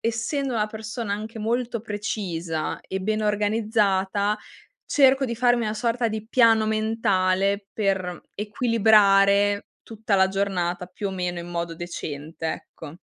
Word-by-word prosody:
essendo 235 +4 -1
una 215 -1 0
persona 220 0 -5
anche 220 +2 -5
molto 235 +1 -1
precisa 190 -7 -3
e 190 - -5
ben 215 +3 -1
organizzata, 210 -1 +1 0.5
cerco 270 -1 +4
di 235 -2 -2
farmi 245 0 +2
una 215 0 -2
sorta 235 +2 0
di 220 0 -4
piano 225 -3 +4
mentale, 200 -3 +1
per 190 -4 -1
equilibrare 205 -2 +3 0.2
tutta 220 -2 -3
la 190 -1 +4
giornata 180 -3 -1
più 190 +3 -5
o - - -4
meno 180 -2 -3
in 170 - -8
modo 170 -1 -3
decente, 160 -2 -6
ecco. 160 0 -10
210 Hz, 135 wpm, -24 LUFS, 190-225 Hz, 0.5 s, cerco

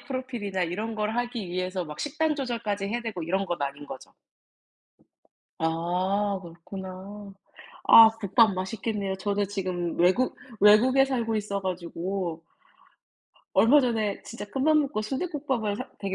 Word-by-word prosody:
프로필이나 240 -8 -3
이런 215 +6 -4
걸 215 0 0
하기 240 -4 -2
위해서 185 +1 -2
막 150 -2 -8
식단 310 +1 0
조절까지 230 -7 -2
해야 235 +3 -2
되고 220 -7 -5
이런 190 +4 -1
건 175 -4 -3
아닌 140 +1 -4
거죠? 130 - -10 1.5
아 180 +5 0
그렇구나. 190 +4 -9 0.5
아 225 -1 +10
국밥 215 +1 +4
맛있겠네요. 195 +1 -3
저는 205 +1 -1
지금 185 -4 -3
외국 185 +9 +3 0.2
외국에 245 +6 +6
살고 235 -5 -1
있어 200 -1 -2
가지고 180 -1 -4 1.1
얼마 280 +6 +6
전에 220 -6 -1
진짜 230 -2 -8
큰맘 275 +8 +2
먹고 270 -6 -3
순대국밥을 265 - -2
사 255 +4 -6
되게 195 -2 -3
205 Hz, 290 characters per minute, -27 LUFS, 185-235 Hz, 1.5 s, 아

